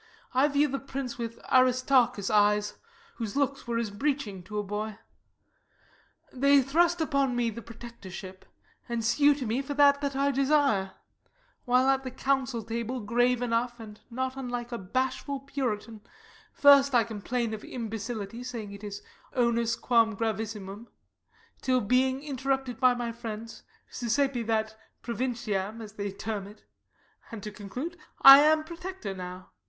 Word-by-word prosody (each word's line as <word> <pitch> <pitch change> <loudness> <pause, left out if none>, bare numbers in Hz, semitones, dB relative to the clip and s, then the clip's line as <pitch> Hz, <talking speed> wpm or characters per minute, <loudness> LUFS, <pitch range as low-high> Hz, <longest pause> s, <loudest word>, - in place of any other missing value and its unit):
I 260 +3 +4
view 290 0 +2
the 275 0 -3
prince 275 -1 -6
with 230 0 -4
Aristarchus' 255 -4 +3
eyes, 210 0 +3 0.4
Whose 225 -4 -4
looks 280 -2 -1
were 235 -1 -1
as 230 -2 -1
a - - -13
breeching 235 -5 -2
to 210 +2 -6
a 210 - 0
boy. 210 +1 -4 1.4
They 280 +1 +4
thrust 340 +5 +2
upon 275 -5 +1
me 240 -1 +1
the 230 +2 -8
protectorship, 200 -5 -10 0.5
And 235 -2 -2
sue 285 +5 +4
to 270 -3 -5
me 235 +4 0
for 280 +1 -5
that 285 0 +5
that 280 -1 -2
I 280 +1 +2
desire; 275 -8 +2 0.7
While 250 +1 +3
at 270 0 +2
the 260 - -4
council 265 -2 -1
table, 230 +3 -3
grave 245 +3 +1
enough, 240 0 -1
And 215 -2 -11
not 260 +2 -3
unlike 245 -2 -5
a 235 - -4
bashful 260 +6 -2
puritan, 230 -6 -4 0.5
First 280 -2 +6
I 235 - +5
complain 230 +1 -3
of 215 - -6
imbecility, 225 -1 -5
Saying 235 -5 -6
it 200 +1 -11
is 205 -1 -7 0.3
onus 235 -2 +1
quam 230 -3 +2
gravissimum; 220 -1 -4 0.7
Till, 255 -1 +2
being 260 +4 +1
interrupted 270 -3 -2
by 255 -1 +5
my 240 -1 -3
friends, 230 -1 -7 0.3
Suscepi 250 +1 0
that 220 -1 0 0.3
provinciam, 230 -4 -2
as 215 -2 -9
they 205 -2 -4
term 200 0 -5
it; 210 +1 -15 0.7
And, 220 -3 -7
to 210 - -5
conclude, 250 - -6 0.3
I 275 +1 +12
am 310 +1 +4
Protector 345 - -6
now. 180 0 -8
240 Hz, 150 wpm, -28 LUFS, 215-270 Hz, 1.4 s, I